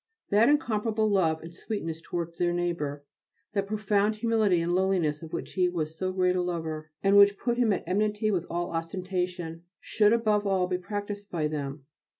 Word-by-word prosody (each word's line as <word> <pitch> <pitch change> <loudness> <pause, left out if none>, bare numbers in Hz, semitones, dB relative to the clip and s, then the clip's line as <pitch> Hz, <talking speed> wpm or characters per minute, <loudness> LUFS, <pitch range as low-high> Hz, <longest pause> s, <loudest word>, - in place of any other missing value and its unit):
That 215 +5 +5
incomparable 220 -6 +1
love 165 -6 +2
and 165 +1 -9
sweetness 165 -4 -5
towards 170 -1 -5
their 175 -1 +2
neighbour, 150 -5 -2 0.5
that 200 -1 0
profound 210 0 +1
humility 215 -5 +2
and 170 +1 0
lowliness 180 -5 +1
of 160 -1 -9
which - - -5
he 180 -1 +2
was 160 -3 -3
so 185 +3 -2
great 185 -1 +2
a 180 - +1
lover, 160 -3 -3
and 200 +1 +5
which 200 0 +7
put 240 0 -1
him 235 -3 +3
at 195 - -1
enmity 210 +2 +1
with 175 -4 -1
all 175 +1 -2
ostentation, 180 0 -3 0.2
should 210 -1 +2
above 215 -3 +2
all 190 -2 +2
be 180 0 -2
practised 205 +1 -5
by 160 -3 -1
them. 140 -2 -5
185 Hz, 180 wpm, -28 LUFS, 165-210 Hz, 0.5 s, which